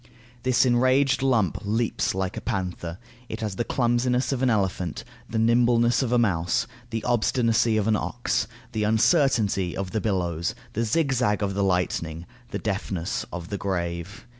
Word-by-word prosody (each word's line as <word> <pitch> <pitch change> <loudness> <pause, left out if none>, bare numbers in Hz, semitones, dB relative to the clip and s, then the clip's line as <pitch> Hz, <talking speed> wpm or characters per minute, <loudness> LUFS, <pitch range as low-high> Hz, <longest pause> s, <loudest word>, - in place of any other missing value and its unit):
This 130 +1 +3
enraged 130 +3 +3
lump 115 - +2
leaps 110 -1 0
like 95 0 -2
a - - -5
panther, 90 -6 -3 0.3
it 110 - -5
has 105 -3 -3
the - - +1
clumsiness 125 +1 +1
of 135 -2 -1
an 130 - +3
elephant, 95 -6 -1 0.3
the 115 - -2
nimbleness 120 +1 +3
of 125 -3 -1
a 125 - +4
mouse, 90 -3 +1 0.2
the 115 -1 -3
obstinacy 115 -1 +2
of 105 0 0
an 110 - +3
ox, 120 +3 -1 0.2
the 110 -3 -1
uncertainty 110 - +2
of 95 -1 -3
the 110 - -1
billows, 85 -5 -1 0.2
the 115 +2 0
zigzag 120 -5 +1
of 100 -1 -1
the 100 +1 0
lightning, 90 -3 -1 0.2
the - - -3
deafness 95 -4 -3
of 85 0 -6
the 100 - -3
grave. 90 +3 -3
110 Hz, 165 wpm, -25 LUFS, 95-120 Hz, 0.3 s, a